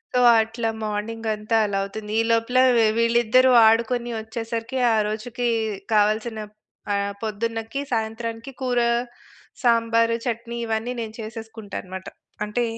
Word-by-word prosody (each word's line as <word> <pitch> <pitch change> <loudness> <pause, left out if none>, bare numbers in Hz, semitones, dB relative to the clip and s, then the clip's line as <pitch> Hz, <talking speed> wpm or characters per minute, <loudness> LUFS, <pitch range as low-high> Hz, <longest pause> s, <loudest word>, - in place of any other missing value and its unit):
So, 250 - +4 0.2
అట్లా 225 +1 -3
morning 215 +2 -3
అంతా 215 +2 0
అలా 200 -1 -1
అవుతుంది. 210 +2 -6
ఈ - - +1
లోపల 230 +2 +1 0.4
వీళ్ళిద్దరూ 235 +2 +4 0.2
ఆడుకొని 235 +2 +2
వచ్చేసరికి, 230 +3 -4 0.2
ఆ - - +3
రోజుకి 235 +3 -4 0.5
కావాల్సిన 215 +2 +2 0.5
ఆహ్, 200 0 0
పొద్దున్నకి 225 +3 -3
సాయంత్రానికి 225 +2 -3
కూర, 250 -2 +1 0.8
సాంబారు, 230 -1 +3
చట్నీ 235 0 -3
ఇవన్నీ 225 +2 -2
నేను 220 -1 -6
చేసేసుకుంటా 220 -2 -8
అనమాట. 190 0 -8 0.4
అంటే 210 +4 -1
225 Hz, 115 wpm, -23 LUFS, 215-235 Hz, 0.8 s, So